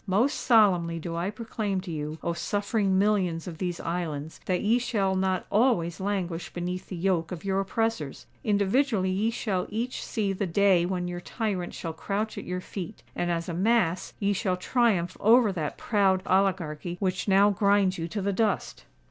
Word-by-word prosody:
Most 215 Hz, +9 st, +2 dB
solemnly 185 Hz, -8 st, +4 dB
do 165 Hz, +1 st, -5 dB
I 170 Hz, +3 st, -1 dB
proclaim 215 Hz, -2 st, -3 dB
to 180 Hz, -2 st, -7 dB
you, 155 Hz, 0 st, -4 dB
O 170 Hz, -, 0 dB
suffering 200 Hz, +2 st, 0 dB
millions 190 Hz, -5 st, +1 dB
of 165 Hz, -2 st, -7 dB
these 175 Hz, -2 st, -2 dB
islands, 160 Hz, -3 st, -4 dB
that 180 Hz, -1 st, +1 dB
ye 225 Hz, +4 st, +3 dB
shall 200 Hz, -6 st, 0 dB
not 185 Hz, -1 st, 0 dB
always 205 Hz, -7 st, +2 dB
languish 190 Hz, -4 st, -2 dB
beneath 180 Hz, +1 st, -4 dB
the 185 Hz, -, -5 dB
yoke 175 Hz, -1 st, 0 dB
of 180 Hz, 0 st, -6 dB
your 195 Hz, 0 st, +1 dB
oppressors! 195 Hz, -7 st, -2 dB, 0.2 s
Individually 205 Hz, 0 st, +2 dB
ye 205 Hz, +4 st, +1 dB
shall 200 Hz, -5 st, -2 dB
each 235 Hz, +4 st, -3 dB
see 205 Hz, -4 st, -1 dB
the 195 Hz, +1 st, -2 dB
day 180 Hz, -1 st, +3 dB
when 180 Hz, -1 st, -2 dB
your 175 Hz, 0 st, -5 dB
tyrant 195 Hz, -4 st, -3 dB
shall 165 Hz, -2 st, -5 dB
crouch 205 Hz, +6 st, -3 dB
at -, -, -6 dB
your 180 Hz, 0 st, -3 dB
feet; 195 Hz, +2 st, -7 dB
and 175 Hz, -, -1 dB
as 170 Hz, -1 st, -1 dB
a 175 Hz, -, -3 dB
mass 185 Hz, -2 st, +1 dB
ye 205 Hz, 0 st, +1 dB
shall 185 Hz, -1 st, 0 dB
triumph 185 Hz, -4 st, +1 dB
over 225 Hz, 0 st, +5 dB
that 160 Hz, -6 st, -3 dB
proud 195 Hz, -3 st, +2 dB
oligarchy 180 Hz, -3 st, 0 dB
which 185 Hz, 0 st, -1 dB
now 200 Hz, +1 st, +5 dB
grinds 200 Hz, -2 st, +2 dB
you 165 Hz, -, -2 dB
to 200 Hz, +3 st, -4 dB
the 200 Hz, 0 st, 0 dB
dust! 210 Hz, -1 st, -1 dB
190 Hz, 180 wpm, -27 LUFS, 175-205 Hz, 0.2 s, over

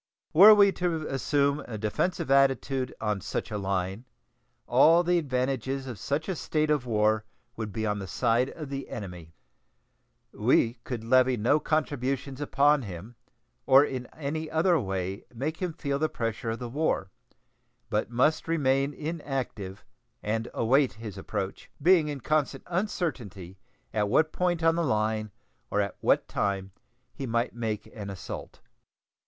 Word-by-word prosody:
Were 205 Hz, +6 st, +10 dB
we 200 Hz, -1 st, +6 dB
to 170 Hz, -4 st, -2 dB
assume 140 Hz, +1 st, +1 dB
a 110 Hz, -, -5 dB
defensive 120 Hz, -, -1 dB
attitude 135 Hz, -1 st, +2 dB
on 105 Hz, -3 st, -1 dB
such -, -, -4 dB
a 105 Hz, -, -2 dB
line, 95 Hz, +3 st, -2 dB, 0.6 s
all 160 Hz, +8 st, +5 dB
the 175 Hz, 0 st, +3 dB
advantages 135 Hz, -1 st, -2 dB
of 120 Hz, -6 st, -7 dB
such 145 Hz, -, -2 dB
a 190 Hz, -, -1 dB
state 155 Hz, -1 st, 0 dB
of 145 Hz, -4 st, 0 dB
war 110 Hz, -1 st, +2 dB, 0.3 s
would 110 Hz, -2 st, -5 dB
be 110 Hz, +2 st, -3 dB
on 105 Hz, -1 st, -1 dB
the 95 Hz, -, -6 dB
side 120 Hz, +5 st, +1 dB
of 155 Hz, -4 st, -8 dB
the 135 Hz, -1 st, -5 dB
enemy. 90 Hz, -6 st, -8 dB, 1.0 s
We 115 Hz, +1 st, +2 dB
could 120 Hz, -3 st, -4 dB
levy 130 Hz, +1 st, +4 dB
no 120 Hz, +8 st, +3 dB
contributions 140 Hz, -3 st, -1 dB
upon 145 Hz, 0 st, +3 dB
him, 100 Hz, +2 st, -8 dB, 0.5 s
or 135 Hz, +2 st, +7 dB
in 130 Hz, -3 st, -5 dB
any 155 Hz, +1 st, -4 dB
other 170 Hz, +1 st, +3 dB
way 95 Hz, -2 st, -3 dB
make 150 Hz, +7 st, -3 dB
him 180 Hz, -2 st, -2 dB
feel 140 Hz, -3 st, -3 dB
the 155 Hz, +1 st, +1 dB
pressure 115 Hz, 0 st, -3 dB
of 115 Hz, -, -2 dB
the 125 Hz, -, -5 dB
war, 120 Hz, -7 st, -1 dB, 0.8 s
but 105 Hz, +1 st, 0 dB
must 130 Hz, +8 st, +1 dB
remain 140 Hz, -3 st, +1 dB
inactive 135 Hz, -, -5 dB, 0.4 s
and 110 Hz, +2 st, -1 dB
await 130 Hz, +4 st, +2 dB
his 110 Hz, -3 st, -8 dB
approach, 95 Hz, 0 st, -5 dB
being 165 Hz, 0 st, +5 dB
in 145 Hz, -3 st, -4 dB
constant 150 Hz, -2 st, 0 dB
uncertainty 125 Hz, -, -3 dB, 0.3 s
at 105 Hz, -1 st, +1 dB
what 155 Hz, +7 st, +3 dB
point 175 Hz, -2 st, 0 dB
on 165 Hz, 0 st, +5 dB
the 170 Hz, +1 st, 0 dB
line 110 Hz, -4 st, 0 dB, 0.4 s
or 105 Hz, -, 0 dB
at 100 Hz, -2 st, -1 dB
what -, -, +2 dB
time 95 Hz, -1 st, -2 dB, 0.4 s
he 135 Hz, -, -5 dB
might 115 Hz, +1 st, 0 dB
make 110 Hz, -3 st, -3 dB
an 105 Hz, -3 st, -6 dB
assault. 95 Hz, -1 st, -8 dB
130 Hz, 155 wpm, -28 LUFS, 110-150 Hz, 1.0 s, Were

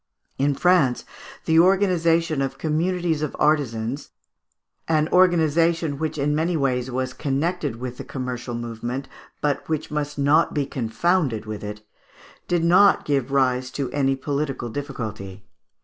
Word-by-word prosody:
In 140 Hz, +1 st, +2 dB
France 170 Hz, -7 st, +3 dB, 0.4 s
the 160 Hz, 0 st, +4 dB
organization 170 Hz, -4 st, +3 dB
of 135 Hz, -, -2 dB
communities 165 Hz, 0 st, 0 dB
of 150 Hz, -, -3 dB
artisans, 135 Hz, -3 st, 0 dB, 0.8 s
an 155 Hz, -1 st, +2 dB
organization 165 Hz, -3 st, +3 dB
which 155 Hz, -1 st, -2 dB
in 145 Hz, +1 st, +1 dB
many 165 Hz, +3 st, 0 dB
ways 130 Hz, -3 st, 0 dB
was 130 Hz, 0 st, -2 dB
connected 145 Hz, 0 st, -1 dB
with 125 Hz, +1 st, -6 dB
the -, -, -6 dB
commercial 125 Hz, -2 st, -5 dB
movement, 120 Hz, +3 st, -5 dB, 0.3 s
but 145 Hz, +1 st, -1 dB
which 155 Hz, -1 st, -2 dB
must 150 Hz, -1 st, -3 dB
not 145 Hz, +3 st, +3 dB
be 145 Hz, -2 st, +1 dB
confounded 130 Hz, -, 0 dB
with 110 Hz, -1 st, -6 dB
it, 105 Hz, +1 st, -7 dB, 0.6 s
did 175 Hz, -2 st, +1 dB
not 185 Hz, +4 st, +5 dB
give 140 Hz, -3 st, 0 dB
rise 130 Hz, -2 st, +1 dB
to 135 Hz, -3 st, -2 dB
any 135 Hz, -1 st, +1 dB
political 140 Hz, -2 st, -3 dB
difficulty. 105 Hz, -7 st, -6 dB
145 Hz, 135 wpm, -23 LUFS, 125-165 Hz, 0.8 s, not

